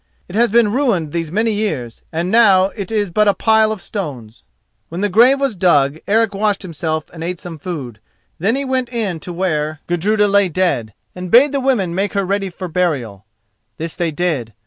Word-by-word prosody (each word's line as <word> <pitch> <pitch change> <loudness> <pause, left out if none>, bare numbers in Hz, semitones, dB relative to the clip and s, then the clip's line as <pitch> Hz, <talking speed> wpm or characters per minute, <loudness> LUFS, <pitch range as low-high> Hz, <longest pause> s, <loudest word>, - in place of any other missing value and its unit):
It 175 - -12
has 235 +2 +3
been 225 -1 +3
ruined 215 - 0
these 165 -1 -3
many 220 +4 +1
years, 155 - -3
and 170 +3 -2
now 195 -5 +5
it 200 -2 -6
is 205 -4 0
but 210 +4 +2
a 200 - +3
pile 220 +1 +3
of 215 -4 -5
stones. 130 - -6 0.5
When 170 +3 -5
the 205 - +1
grave 245 +8 +5
was 275 -5 0
dug, 155 -5 +2
Eric 220 0 +2
washed 205 0 0
himself 160 -3 -3
and 165 -1 -7
ate 175 +1 -3
some 165 -3 -8
food. 140 -10 -6 0.4
Then 200 +8 +1
he 275 +1 -2
went 260 -2 -1
in 210 -8 -2
to 175 - -7
where 155 -4 -2
Gudruda 205 +5 +1
lay 200 -1 +3
dead, 140 - -1 0.2
and 180 0 -7
bade 260 +7 +6
the 280 - 0
women 245 -10 0
make 195 +3 -1
her 200 -1 0
ready 195 +1 -1
for 185 +1 -7
burial. 140 - -2 0.5
This 165 0 -5
they 170 -1 -1
did. 145 -8 -2
185 Hz, 200 wpm, -18 LUFS, 160-215 Hz, 0.5 s, bade